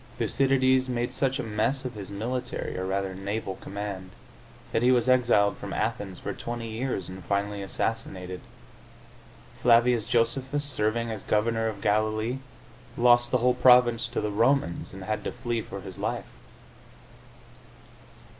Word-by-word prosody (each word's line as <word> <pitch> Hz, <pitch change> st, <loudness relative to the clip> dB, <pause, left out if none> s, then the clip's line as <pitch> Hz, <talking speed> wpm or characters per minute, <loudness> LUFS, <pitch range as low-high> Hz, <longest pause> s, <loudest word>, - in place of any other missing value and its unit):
Thycydides 130 Hz, -1 st, +2 dB
made 120 Hz, 0 st, -1 dB
such 135 Hz, 0 st, +1 dB
a -, -, -3 dB
mess 115 Hz, +5 st, -1 dB
of 125 Hz, -, -4 dB
his 100 Hz, -3 st, -7 dB
military 125 Hz, +5 st, -3 dB
(or, 95 Hz, 0 st, -3 dB
rather, 95 Hz, 0 st, -1 dB
naval) 95 Hz, 0 st, -4 dB
command 100 Hz, -2 st, -6 dB, 0.6 s
that -, -, +1 dB
he 125 Hz, +1 st, +5 dB
was 125 Hz, -1 st, +3 dB
exiled 120 Hz, -5 st, +4 dB
from -, -, -6 dB
Athens 105 Hz, -4 st, -2 dB
for -, -, -5 dB
twenty 120 Hz, -1 st, -5 dB
years 110 Hz, -4 st, -3 dB
and 95 Hz, 0 st, -9 dB
finally 100 Hz, 0 st, -1 dB
assassinated. 95 Hz, -3 st, -3 dB, 1.2 s
Flavius 120 Hz, -1 st, +4 dB
Josephus, 130 Hz, +4 st, +1 dB
serving 115 Hz, -3 st, -1 dB
as 110 Hz, -3 st, -4 dB
governor 115 Hz, +1 st, +1 dB
of 105 Hz, -3 st, -5 dB
Galilee, 110 Hz, +4 st, +1 dB, 0.6 s
lost 120 Hz, 0 st, +5 dB
the 125 Hz, -, +3 dB
whole 125 Hz, -, +5 dB
province 125 Hz, -1 st, +5 dB
to 120 Hz, -, -3 dB
the 105 Hz, -, -2 dB
Romans, 115 Hz, -3 st, +1 dB
and 95 Hz, 0 st, -9 dB
had 105 Hz, +3 st, -2 dB
to -, -, -3 dB
flee 120 Hz, -1 st, -2 dB
for 100 Hz, -2 st, -8 dB
his 95 Hz, -2 st, -9 dB
life. -, -, -2 dB
115 Hz, 145 wpm, -27 LUFS, 100-125 Hz, 1.2 s, he